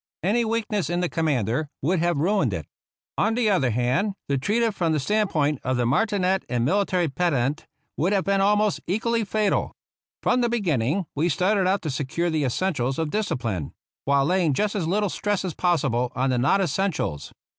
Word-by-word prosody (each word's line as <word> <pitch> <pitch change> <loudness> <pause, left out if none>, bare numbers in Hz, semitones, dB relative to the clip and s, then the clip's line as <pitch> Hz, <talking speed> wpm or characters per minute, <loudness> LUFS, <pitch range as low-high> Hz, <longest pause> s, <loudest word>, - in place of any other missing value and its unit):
Any 220 +6 +2
weakness 215 -6 -1
in 175 +1 0
the 180 - 0
commander 145 -3 0
would 175 +5 +1
have 170 -1 +1
ruined 195 +7 +1
it. - - -5 0.5
On 225 - +2
the 230 -3 +2
other 145 -10 +2
hand, 125 - 0 0.2
to 140 - +2
treat 210 - +1
it 225 -2 +1
from 170 -4 0
the 155 - +1
stand 210 +8 +1
point 150 -2 0
of 130 -1 0
the 120 - +1
marti 205 - +1
net 190 0 +1
and 120 -1 0
military 185 +1 +1
pedant 145 -2 -1 0.3
would 175 +5 +1
have 195 -2 +2
been 195 0 +1
almost 210 +1 +2
equally 225 +5 0
fatal. 210 0 0 0.5
From 250 - +2
the 240 - +1
beginning 175 - 0
we 160 +4 0
started 185 +4 +2
out 195 +2 +1
to 155 - -2
secure 155 +6 -2
the 155 -3 0
essentials 135 -2 -1
of 160 -2 -2
discipline, 115 - -2 0.3
while 140 0 +3
laying 175 -3 +2
just 210 +5 0
as 190 -7 -2
little 205 +4 +1
stress 205 +1 -2
as 180 - -3
possible 135 -9 0
on 130 +1 +1
the 125 - +1
non 145 +10 +3
essentials. 170 - -2
175 Hz, 195 wpm, -24 LUFS, 140-200 Hz, 0.5 s, while